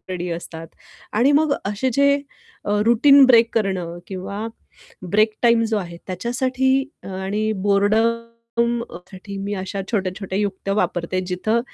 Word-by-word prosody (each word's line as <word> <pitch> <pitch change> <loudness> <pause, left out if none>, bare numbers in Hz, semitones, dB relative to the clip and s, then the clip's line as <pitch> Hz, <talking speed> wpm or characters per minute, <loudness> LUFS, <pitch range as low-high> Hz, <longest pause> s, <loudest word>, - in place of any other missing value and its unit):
Ready 180 -1 -4
असतात. 165 -1 -6 0.5
आणि 240 +7 +3
मग 300 0 +3
असे 210 +6 -1
जे 280 +1 +4 0.5
अ, - - -3 0.2
रुटीन 275 +4 +7
ब्रेक 235 -2 +5
करणं 185 -6 -1
किंवा 200 +3 -5 0.6
ब्रेक 215 +1 +3
टाईम 235 -1 +4
जो 220 - +1
आहे 170 -3 -7
त्याच्यासाठी 250 +7 -1 0.4
अ, - - -8
आणि 190 +2 -3 0.3
बोर्डमसाठी 230 -2 -1
मी 205 +1 -2
अशा 195 +1 -4
छोट्या-छोट्या 190 -1 -2
युक्त्या 195 -1 -2
वापरते 180 -1 -1
जिथं 215 +6 0
205 Hz, 130 wpm, -21 LUFS, 185-235 Hz, 0.6 s, रुटीन